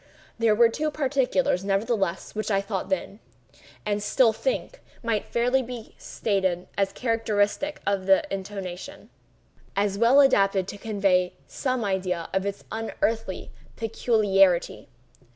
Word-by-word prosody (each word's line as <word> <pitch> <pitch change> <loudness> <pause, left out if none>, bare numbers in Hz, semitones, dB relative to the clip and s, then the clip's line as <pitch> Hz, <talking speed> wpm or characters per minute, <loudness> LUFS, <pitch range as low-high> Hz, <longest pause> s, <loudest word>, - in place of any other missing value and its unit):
There 225 -2 +4
were 235 +2 +6
two 305 +7 -2
particulars, 270 -8 +1
nevertheless, 195 -2 -1
which 215 +1 -3
I 195 -2 +2
thought 195 -1 -4
then, 225 -7 -2 0.7
and 205 0 0
still 225 +2 +3
think, - - -3 0.2
might 230 -2 -1
fairly 250 +3 +2
be 240 -2 -8
stated 190 -4 -1
as 195 -1 +1
characteristic 230 +4 0
of 195 -2 0
the 195 -1 +5
intonation—as 195 +1 -6
well 240 +5 +6
adapted 195 -8 +4
to 205 - -7
convey 195 -4 +1
some 255 -4 -2
idea 185 -4 -2
of 190 +1 0
its 200 - -5
unearthly 225 -2 -2 0.2
peculiarity. 205 -5 +2
210 Hz, 120 wpm, -25 LUFS, 195-235 Hz, 0.7 s, were